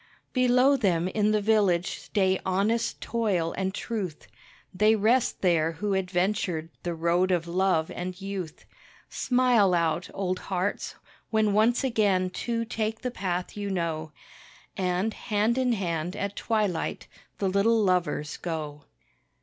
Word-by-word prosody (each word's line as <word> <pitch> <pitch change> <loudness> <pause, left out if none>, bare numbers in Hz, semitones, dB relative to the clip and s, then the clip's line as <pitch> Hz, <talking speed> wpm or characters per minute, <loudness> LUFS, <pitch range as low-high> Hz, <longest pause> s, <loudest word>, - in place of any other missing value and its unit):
Below 255 +2 +4
them 180 -7 +1
in 210 +2 +1
the 215 -1 +1
village 200 -5 +2
stay 190 -2 +1
honest 210 +5 0
toil 195 -8 0
and 190 0 -1
truth, 195 - -4 0.5
They 215 +4 +4
rest 225 +4 +2
there 165 -3 +3
who 200 +5 -2
adventured 185 -3 -1
the 175 -1 -3
road 170 +3 +2
of 175 -2 0
love 175 -2 +1
and 180 +1 -5
youth. 195 -5 -6 0.5
Smile 245 -7 +3
out, 170 +1 0
old 185 -2 -2
hearts, 190 +1 -2 0.3
when 215 -2 +2
once 225 +5 +3
again 200 -7 +2
two 230 +4 -2
take 220 -1 -3
the 250 - -2
path 180 -5 -3
you 205 -1 -4
know, 165 -4 -2 0.6
And, 185 +3 0
hand 220 +3 0
in 250 -2 +2
hand, 175 -3 -2
at 200 0 -3
twilight 210 -7 -1 0.3
the 195 - 0
little 200 +4 +3
lovers 180 -5 0
go. 150 -4 -5
195 Hz, 135 wpm, -27 LUFS, 175-220 Hz, 0.6 s, Below